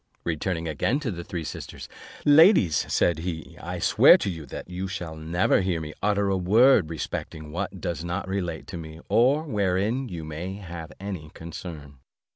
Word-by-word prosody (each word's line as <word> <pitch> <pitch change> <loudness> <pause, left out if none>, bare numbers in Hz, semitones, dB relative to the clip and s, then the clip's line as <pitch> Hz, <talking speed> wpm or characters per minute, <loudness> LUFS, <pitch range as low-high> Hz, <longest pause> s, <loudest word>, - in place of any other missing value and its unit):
Returning 85 +1 -2
again 105 - 0
to 125 -7 -2
the 85 -2 -6
three 85 -1 -5
sisters, - - -7 0.4
"Ladies," 145 - +5
said 85 -3 +2
he, 80 -2 -5
"I - - -5
swear - - +7
to 100 - -2
you 80 -4 -8
that - - -7
you 90 +1 -4
shall 90 -4 -5
never 85 +7 +1
hear 90 -3 0
me 75 -1 -6
utter 100 -1 +2
a 95 -1 +1
word 105 - +5
respecting 80 -1 -5
what 95 +2 -4
does 85 -2 -3
not 90 +3 -3
relate 90 -4 -3
to 85 - -5
me, 80 -1 -9
or 135 +6 +4
wherein 105 - 0
you 85 -4 -6
may 80 +5 -5
have 85 -5 -8
any 95 -6 -6
concern." 80 -4 -9
90 Hz, 175 wpm, -26 LUFS, 80-100 Hz, 0.4 s, swear